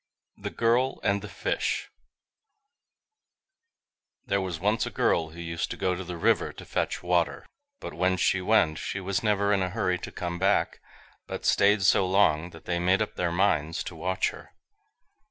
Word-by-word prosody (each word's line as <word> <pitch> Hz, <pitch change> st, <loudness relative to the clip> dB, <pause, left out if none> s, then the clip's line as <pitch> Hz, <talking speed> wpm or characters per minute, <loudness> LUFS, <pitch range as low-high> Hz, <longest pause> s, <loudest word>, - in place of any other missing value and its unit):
THE -, -, -6 dB
GIRL 120 Hz, +3 st, +1 dB
AND 100 Hz, 0 st, +1 dB
THE 105 Hz, -, -8 dB
FISH -, -, -2 dB, 2.3 s
There 100 Hz, 0 st, 0 dB
was 90 Hz, -4 st, -4 dB
once 105 Hz, +5 st, +1 dB
a -, -, -2 dB
girl 80 Hz, -1 st, +1 dB
who 80 Hz, +2 st, -12 dB
used 85 Hz, -1 st, -3 dB
to -, -, -5 dB
go 90 Hz, -, 0 dB
to 95 Hz, +1 st, -4 dB
the 90 Hz, -1 st, -6 dB
river -, -, +2 dB
to -, -, -11 dB
fetch -, -, -2 dB
water, 90 Hz, -1 st, 0 dB, 0.3 s
but -, -, -7 dB
when 95 Hz, 0 st, +1 dB
she 95 Hz, +1 st, +2 dB
went 90 Hz, -6 st, +2 dB
she 95 Hz, -, -4 dB
was 95 Hz, +1 st, -1 dB
never 105 Hz, -1 st, +2 dB
in 100 Hz, -, +2 dB
a 90 Hz, -, 0 dB
hurry 90 Hz, -3 st, -1 dB
to -, -, -7 dB
come 85 Hz, -1 st, -4 dB
back, 95 Hz, +1 st, +1 dB, 0.5 s
but -, -, -6 dB
staid 100 Hz, 0 st, +4 dB
so 95 Hz, -1 st, +4 dB
long, 90 Hz, -4 st, +3 dB
that 80 Hz, -2 st, -14 dB
they 85 Hz, -1 st, -1 dB
made 95 Hz, +4 st, +3 dB
up 105 Hz, -, -8 dB
their 90 Hz, -1 st, -1 dB
minds 85 Hz, -4 st, +1 dB
to 95 Hz, -, -7 dB
watch 90 Hz, +3 st, -1 dB
her. -, -, -14 dB
95 Hz, 180 wpm, -27 LUFS, 85-100 Hz, 2.3 s, staid